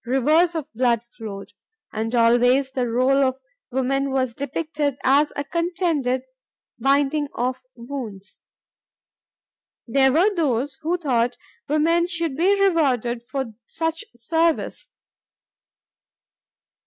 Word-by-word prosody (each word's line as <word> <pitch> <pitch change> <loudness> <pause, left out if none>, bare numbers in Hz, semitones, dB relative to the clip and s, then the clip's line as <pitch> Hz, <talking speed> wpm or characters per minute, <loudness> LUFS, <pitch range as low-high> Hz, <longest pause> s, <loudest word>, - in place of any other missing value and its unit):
Rivers 305 +8 +2
of 315 -4 -2
blood 235 -1 +1
flowed. 215 -4 -9 0.4
And 225 +2 -2
always 245 +3 +4
the 255 -2 -1
role 260 +4 +3
of 260 -1 +1 0.4
woman 270 +2 0
was 260 -2 0
depicted 290 0 -3
as 285 +3 +4
a 285 - -2
contented 330 -6 -1 0.6
binding 280 +3 +2
of 255 +2 -2
wounds. 235 -6 -8 1.5
There 265 +2 +3
were 360 +9 +3
those 280 - -1
who 335 +3 0
thought 245 -7 0 0.3
woman 330 +3 +2
should 335 -5 -1
be 385 +6 +2
rewarded 265 - +2
for 265 -5 -3
such 325 0 -3
service. 325 +7 0
270 Hz, 105 wpm, -23 LUFS, 245-320 Hz, 1.5 s, always